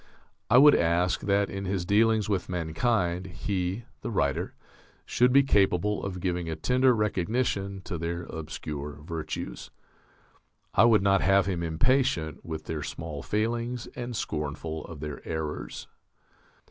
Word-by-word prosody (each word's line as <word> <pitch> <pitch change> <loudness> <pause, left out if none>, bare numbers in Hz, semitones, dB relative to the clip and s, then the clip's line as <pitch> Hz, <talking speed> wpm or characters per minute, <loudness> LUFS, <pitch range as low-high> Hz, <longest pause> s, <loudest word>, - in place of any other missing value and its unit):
I - - +6
would 145 +3 +9
ask 85 +2 +2
that 100 0 +1
in 95 0 -4
his 95 -2 -1
dealings 110 +2 +3
with 100 -4 -1
mankind 90 +1 0
he 90 +3 -3 0.2
[the - - -4
writer] 70 - -1 0.5
should 125 +1 +3
be 140 +2 +6
capable 100 -4 +2
of 95 -2 -4
giving 90 -2 -2
a 80 - -2
tender 125 +9 +3
recognition 100 -1 -1
to 85 -2 -5
their 85 +1 -3
obscure 75 -2 -6
virtues. 80 -1 -5 1.0
I 110 - +6
would 110 -4 +5
not 100 -1 +4
have 95 -1 +4
him 90 -3 -2
impatient 85 - +1
with 80 -1 -5
their 80 -2 -3
small 80 -2 -5
failings 115 - -1
and 120 0 -5
scornful 80 -1 -3
of 80 -4 -9
their 75 -2 -5
errors. 80 -2 -5
95 Hz, 140 wpm, -28 LUFS, 80-110 Hz, 1.0 s, would